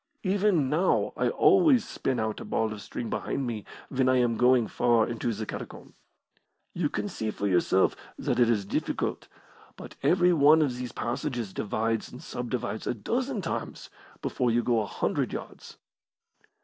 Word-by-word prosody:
Even 190 -6 +2
now 160 +7 +1
I - - +1
always 330 - +4
spin 130 -3 -2
out 110 -1 -2
a - - -6
ball 110 -1 -1
of 105 - -8
string 115 +3 -5
behind 135 - -2
me 115 -4 -4 0.2
when 130 -1 +1
I 130 - +4
am 120 -2 +2
going 125 -1 +4
far 120 0 +2
into 120 0 -2
the 110 0 -4
catacomb. - - -8 0.8
You 170 -4 0
can - - -3
see 110 - -3
for 100 - -4
yourself 95 0 +3 0.2
that - - -1
it 120 -1 +5
is 105 -4 +1
difficult, - - -2 0.5
but - - -11
every 180 0 +4
one 155 0 +6
of 130 -4 -1
these 125 0 -5
passages 120 -4 -3
divides 110 +1 -2
and 125 - -10
subdivides 120 -2 -4
a - - 0
dozen 240 - -2
times 165 - -5 0.3
before 125 - 0
you 120 +1 +2
go 115 -2 +2
a 105 - -4
hundred - - -1
yards." - - -8
125 Hz, 170 wpm, -28 LUFS, 110-155 Hz, 0.8 s, one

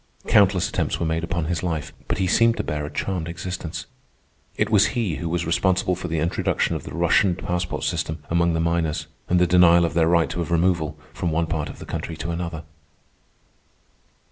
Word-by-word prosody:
Countless 95 -3 +4
attempts - - -1
were 85 - -1
made 80 +1 -1
upon 85 -1 -2
his 85 0 -1
life, 80 -4 -3
but - - -1
he 95 - +1
seemed 115 +5 +3
to - - -1
bear 75 -1 -3
a - - -6
charmed 85 +2 -2
existence. 85 0 -5 0.7
It - - 0
was 105 -2 +5
he 100 -10 0
who 85 - -4
was 85 0 -1
responsible 90 +2 +1
for 90 0 -4
the 80 -1 -2
introduction 80 +2 0
of - - -4
the - - -8
Russian 85 +2 +3
passport 90 -1 -3
system 80 -2 -2
among 85 0 +2
the 80 - 0
miners, 80 -2 0 0.2
and 90 - +3
the 90 - +5
denial 85 -1 +6
of 85 - -2
their 80 -1 +3
right 85 -1 +2
of 85 -1 -2
removal 85 -3 +1 0.2
from 85 - -2
one 80 +1 +1
part 80 -2 -3
of - - -9
the - - -9
country 80 - -5
to 85 - -4
another. 85 -1 -4
85 Hz, 200 wpm, -23 LUFS, 80-90 Hz, 0.7 s, denial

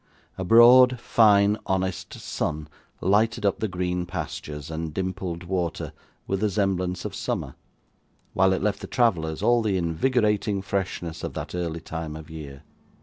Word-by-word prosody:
A 95 - -4
broad, 120 +5 +7
fine, 105 -3 +4
honest 95 -1 -2
sun 75 0 -3 0.3
lighted 110 +4 +2
up 100 - +1
the 110 - 0
green 90 -1 -2
pastures 75 -4 -6
and 80 0 -4
dimpled 95 0 -4
water 90 -2 -3 0.3
with 95 - -1
the 105 +1 +1
semblance 95 -3 -1
of - - -4
summer, - - -3 0.8
while 95 0 +4
it 95 - 0
left 105 -1 0
the - - -6
travellers 80 -10 0
all 120 0 +4
the 105 -4 0
invigorating 105 +2 +1
freshness 95 -4 -3
of - - -5
that - - -5
early 85 -2 -3
time 80 -2 -6
of 80 0 -10
year. 70 -4 -9
95 Hz, 150 wpm, -25 LUFS, 85-105 Hz, 0.8 s, broad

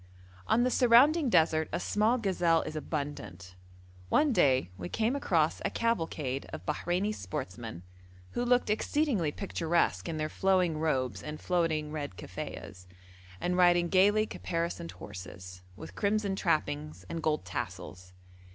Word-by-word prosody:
On 240 - +3
the 250 - +1
surrounding 260 +6 +5
desert 160 -5 +3
a - - -1
small 220 +4 +2
gazelle 175 -7 +2
is 155 - -6
abundant. 140 - -5 0.6
One 295 -3 +3
day 130 - +3
we 90 -1 -6
came 225 +4 0
across 165 - +1
a - - +1
cavalcade 160 - -1
of 155 - -8
Bahreini 175 +6 -1
sportsmen, 95 - -6 0.5
who 240 - -2
looked 245 -3 +2
exceedingly 220 - +1
picturesque 170 -2 0
in 160 - -3
their 155 0 -1
flowing 180 -2 +1
robes 130 -10 0
and 150 0 -6
floating 165 -4 0
red 145 -11 -5
kaffiehs, 90 0 -8 0.5
and 180 0 -1
riding 175 -1 +4
gaily 205 +4 +4
caparisoned 170 - -4
horses, 90 -1 -9
with 105 - -10
crimson 205 -1 0
trappings 150 -4 -1
and 165 - -4
gold 155 -9 0
tassels. 90 0 -6
165 Hz, 135 wpm, -30 LUFS, 140-205 Hz, 0.6 s, surrounding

